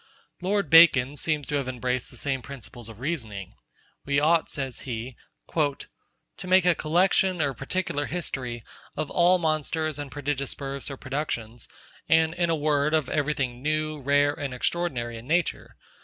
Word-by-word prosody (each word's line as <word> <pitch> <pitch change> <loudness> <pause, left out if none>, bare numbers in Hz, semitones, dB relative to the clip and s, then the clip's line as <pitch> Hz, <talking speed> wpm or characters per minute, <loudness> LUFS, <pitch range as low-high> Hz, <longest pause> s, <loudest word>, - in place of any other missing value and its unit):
Lord 195 -3 0
Bacon 145 -5 +7
seems 150 0 0
to 145 +3 -1
have 135 -2 -2
embraced 125 0 -2
the - - -12
same 135 -2 -1
principles 120 -3 -10
of 110 -1 -12
reasoning. 115 - -4 0.5
'We 140 0 +1
ought,' 160 +2 +3
says 135 -4 -4
he, 120 0 -5 0.3
'to 155 -3 +2 0.8
make 185 0 +5
a 180 - +6
collection 180 +3 +2
or 140 -3 +1
particular 145 +2 -2
history 125 -9 -4 0.3
of 155 -2 -3
all 180 +1 +5
monsters 155 -1 -1
and 145 -1 -5
prodigious 145 -1 -2
births 140 0 -4
or 140 - -6
productions, 125 -5 -4 0.4
and 160 0 +4
in 175 -1 0
a 165 - +3
word 150 0 +2
of 155 -4 0
every 150 0 0
thing 125 -2 -3
new, 155 +1 -1
rare, 145 +1 +3
and 140 -3 -5
extraordinary 125 -6 -2
in 115 - -13
nature. 170 +2 0
145 Hz, 160 wpm, -26 LUFS, 130-160 Hz, 0.8 s, Bacon